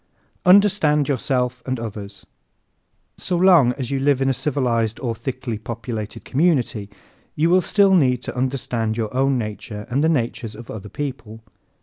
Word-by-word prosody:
Understand 180 -7 +5
Yourself 125 -2 -1
and 130 -2 -3
Others 100 -3 -7 0.9
¶ - - -10
So 180 - 0
long 170 -9 +5
as 130 -1 -5
you 135 - 0
live 140 -1 +2
in 135 0 +1
a - - +2
civilized 125 -5 -1
or 120 -3 -2
thickly 125 -2 -5
populated 115 -2 -6
community 130 - +1 0.5
you 165 +3 +2
will 185 +1 +5
still 200 +1 +3
need 125 -8 +3
to - - -6
understand 125 -4 -2
your 110 -1 -3
own 135 0 +2
nature 105 -2 -5
and 140 +4 +1
the 160 - +3
natures 115 -6 -2
of 115 +1 -10
other 105 -1 -8
people. 120 -6 -6
125 Hz, 160 wpm, -21 LUFS, 115-145 Hz, 0.9 s, Understand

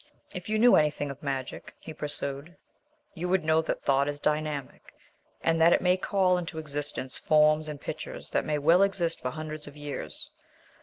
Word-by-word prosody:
"If 180 +1 -6
you 215 - +1
knew 240 +3 +6
anything 150 -1 +1
of 140 +2 -11
magic," 135 -3 -5
he 160 - -9
pursued, 145 +2 -2 0.6
"you 180 0 -4
would 185 -3 +1
know 160 0 +4
that 160 - -3
thought 140 0 +2
is 145 0 -3
dynamic, 150 -2 -3 0.5
and 165 0 +2
that 170 +1 +7
it - - +4
may 180 0 +4
call 185 -1 +2
into 165 -2 -6
existence 145 -3 -3
forms 155 0 +3
and 150 -1 -6
pictures - - -7
that - - +1
may 150 -1 -1
well 165 +6 +4
exist 190 -4 +1
for 125 - -2
hundreds 155 +1 -6
of 145 0 -11
years. 145 -1 -6
155 Hz, 185 wpm, -28 LUFS, 145-170 Hz, 0.6 s, that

